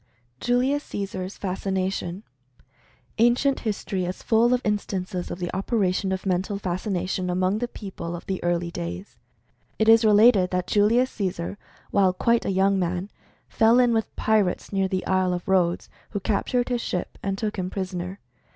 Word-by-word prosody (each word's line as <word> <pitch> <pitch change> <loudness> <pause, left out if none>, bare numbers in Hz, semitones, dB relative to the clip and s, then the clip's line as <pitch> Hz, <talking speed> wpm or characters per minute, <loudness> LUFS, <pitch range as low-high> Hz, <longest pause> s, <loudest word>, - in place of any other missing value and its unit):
julius 255 +4 +1
caesar's 190 -1 -5
fascination. 190 -1 -2 1.0
Ancient 245 +4 +3
history 200 -4 -2
is 180 +1 -5
full 230 +2 +3
of 250 - +3
instances 190 -3 -2
of - - -5
the 175 0 -4
operation 190 -2 0
of 190 +1 -3
Mental 190 +2 0
Fascination 185 -1 -2
among 185 +3 +1
the 245 - -1
people 185 -7 -7
of 175 - -9
the 190 -1 -3
early 175 0 0
days. 85 - -6 0.6
It 220 - +1
is 225 0 +7
related 210 -3 +6
that 180 -1 -1
Julius 230 +5 +3
Caesar, 185 -3 -3 0.4
while 190 -2 +3
quite 235 +5 +1
a - - 0
young 195 +1 +2
man, 180 +2 -2 0.4
fell 225 +1 +4
in 245 -2 +4
with 225 -1 -1
pirates 210 -3 +1
near 195 -1 +2
the 185 -1 -2
Isle 185 -1 +1
of 175 - -7
Rhodes, 180 -2 +2 0.2
who 205 - -3
captured 235 +5 0
his 245 -1 0
ship, 180 - -4
and 195 -1 -2
took 210 0 -3
him 180 0 -2
prisoner. 185 -1 -4
195 Hz, 160 wpm, -25 LUFS, 180-220 Hz, 1.0 s, is